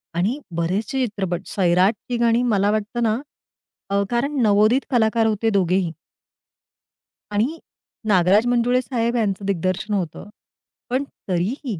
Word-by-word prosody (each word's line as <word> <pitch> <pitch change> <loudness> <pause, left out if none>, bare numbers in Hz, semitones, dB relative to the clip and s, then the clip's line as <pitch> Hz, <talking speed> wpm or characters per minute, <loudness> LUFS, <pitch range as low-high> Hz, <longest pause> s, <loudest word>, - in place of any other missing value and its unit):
आणि 205 - 0 0.2
बरेचशे 210 +10 0
चित्रपट. 190 -5 -3
सैराटची 195 +6 +1
गाणी 235 0 +2
मला 200 0 +2
वाटतं 215 +3 -2
ना 220 -1 +2 0.7
अ, 200 0 +1
कारण 270 +3 0
नवोदित 215 +5 +4
कलाकार 225 -2 +3
होते 220 +1 +1
दोघेही. 185 -3 +1 1.4
आणि 240 +11 0 0.5
नागराज 195 +2 +4
मंजुळे 245 +1 +2
साहेब 235 -2 -1
यांचं 200 -4 -1
दिग्दर्शन 190 +2 -1
होतं. 190 +1 -3 0.6
पण 255 +3 0 0.3
तरीही 200 - -2
215 Hz, 115 wpm, -22 LUFS, 190-240 Hz, 1.4 s, नवोदित